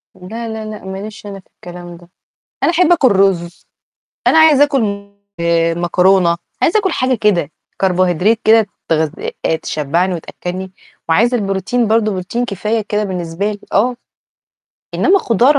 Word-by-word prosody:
لا، 225 +6 -7
لا، 220 -1 -5
لأ، 215 -2 -8
ما 190 0 -6
ليش 210 +1 -9
أنا 200 -1 -7
في - - -21
الكلام 175 -1 -10
ده، 175 0 -18 0.5
أنا - - +3
أحب 350 0 +3
آكل 275 -7 +4
رز، 190 -3 0 0.6
أنا 320 - +5
عايزه 300 -3 +6
آكل، 280 -3 +1
م 200 -1 -4 0.2
آآ، 165 0 +1
مكرونة، 175 0 +2 0.2
عايزه 425 +6 +3
آكل 380 -3 -1
حاجة 255 -3 +1
كده، 185 -8 +1 0.3
Carbohydrate 185 +3 +2
كده 220 -1 +5 0.2
تغذ 160 -2 +1 0.5
تشبّعني 165 +6 -1
وتأكّلني، 180 +2 -6 0.4
وعايزه 235 +9 +3
البروتين 200 +4 -1
برضه، 220 -1 +2
بروتين 195 +6 -3
كفاية 215 +2 -2
كده 210 0 -2
بالنسبة 185 +1 -3
لي، 205 - -7
آه، 240 +5 +2 1.0
إنما 395 +1 +3
خضار، 255 - +3
200 Hz, 150 wpm, -16 LUFS, 180-230 Hz, 1.0 s, عايزه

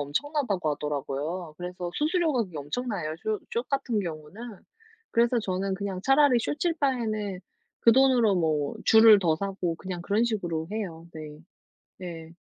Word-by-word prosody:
엄청나다고 200 - -1
하더라고요. 150 +3 -3
그래서 180 0 -5
수수료가 310 - +1
그게 175 -5 -11
엄청나요, 160 - -3
쇼 215 -1 -1
숏 235 +2 -2
같은 265 -6 0
경우는. 180 +6 -7 0.5
그래서 235 +1 +3
저는 195 -2 -2
그냥 195 -1 -4
차라리 270 -2 +5
숏칠 320 +7 -1
바에는 215 -8 -1 0.4
그 230 - +6
돈으로 250 -6 +4
뭐 155 -4 0
주를 220 -2 +8
더 160 -3 +2
사고 190 -3 -2
그냥 180 0 -6
그런 210 +5 +1
식으로 175 -8 -2
해요. 170 -6 -5
네. 155 -1 -9 0.6
네. 165 -3 -8
195 Hz, 320 characters per minute, -27 LUFS, 165-235 Hz, 0.6 s, 주를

